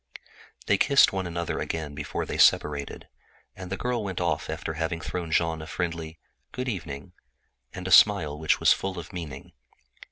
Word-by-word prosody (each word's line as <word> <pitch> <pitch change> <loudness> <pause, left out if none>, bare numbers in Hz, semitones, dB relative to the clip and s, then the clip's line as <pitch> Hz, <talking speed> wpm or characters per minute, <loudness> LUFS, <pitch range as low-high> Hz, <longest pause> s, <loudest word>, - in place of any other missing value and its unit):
They - - +2
kissed 140 -7 +5
one 95 -2 -2
another 85 -1 -3
again 80 -3 -4
before 75 0 -4
they - - -5
separated, 70 -2 +2 0.5
and 95 -1 -9
the 95 - -2
girl 120 -2 -1
went 95 -3 -4
off - - -1
after 80 - -4
having 80 +1 -2
thrown 85 +1 -4
Jean 80 -1 +1
a 80 - -8
friendly 85 -1 -4 0.3
"Good 125 +1 -4
evening" 85 - -5 0.6
and 90 0 -7
a - - -3
smile 90 -10 +6
which 80 -1 +2
was - - +6
full 95 -1 -4
of 85 +3 -8
meaning. 75 -6 -7
85 Hz, 170 wpm, -26 LUFS, 80-95 Hz, 0.6 s, smile